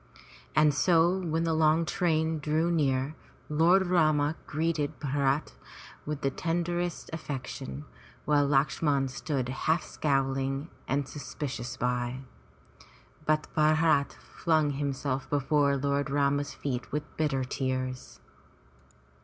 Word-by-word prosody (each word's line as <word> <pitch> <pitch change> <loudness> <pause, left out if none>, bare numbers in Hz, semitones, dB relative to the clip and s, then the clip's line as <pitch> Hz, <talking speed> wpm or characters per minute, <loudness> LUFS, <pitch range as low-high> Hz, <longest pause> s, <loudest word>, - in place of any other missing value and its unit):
And 150 -1 +5
so 170 +4 +3
when 165 -2 -1
the 165 -1 +1
long 160 +1 +3
train 160 -3 +1
drew 155 +3 +1
near. 140 -3 +1 0.4
Lord 170 +5 +4
Rama 155 -4 +3
greeted 155 -1 -1
Bharat 140 0 0 0.5
with 150 -1 -3
the 135 - +1
tenderest 175 +2 -2
affection, 140 -1 -5 0.4
while 145 -1 +3
Lakshman 140 0 +2
stood 135 -1 -3
half 155 +5 0
scowling 135 +1 -1 0.2
and 140 0 0
suspicious 130 -3 -5
by. 125 +1 -1 1.1
But 155 0 +2
Bharat 155 -1 +3
flung 155 -4 0
himself 140 -1 -2
before 145 0 +2
Lord 140 +1 0
Rama's 140 0 +1
feet 125 -3 -4
with 150 +1 -1
bitter 145 -4 0
tears. 130 0 -3
145 Hz, 110 wpm, -29 LUFS, 135-160 Hz, 1.1 s, And